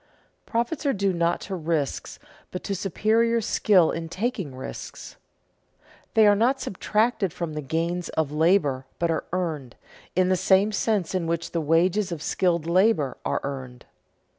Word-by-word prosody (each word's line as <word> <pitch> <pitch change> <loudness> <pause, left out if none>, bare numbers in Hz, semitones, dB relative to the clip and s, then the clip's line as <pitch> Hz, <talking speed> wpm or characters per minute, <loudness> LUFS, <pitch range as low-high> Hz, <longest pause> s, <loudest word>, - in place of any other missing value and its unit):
Profits 235 +8 -1
are 275 - +3
due 195 -2 0
not 170 0 0
to 195 - -6
risks, 160 -5 -2 0.3
but 180 - -6
to 200 - -2
superior 220 +5 +1
skill 200 -5 +3
in 165 0 -4
taking 185 - -3
risks. 130 - -8 1.0
They 220 - +6
are 205 0 +6
not 250 +6 +2
subtracted 215 -2 0
from 170 -1 -4
the 150 - -3
gains 165 +5 -2
of 155 -3 +1
labor 150 -5 +2
but 170 -1 0
are 160 - -2
earned, 160 -8 -3 0.4
in 185 0 +3
the 185 - +4
same 190 +3 +3
sense 205 -4 0
in 180 -3 -1
which 170 0 -2
the 165 - -1
wages 175 +5 +2
of 160 -3 -5
skilled 170 -4 +1
labor 175 - +2
are - - -1
earned. 130 -3 -6
175 Hz, 160 wpm, -25 LUFS, 160-205 Hz, 1.0 s, They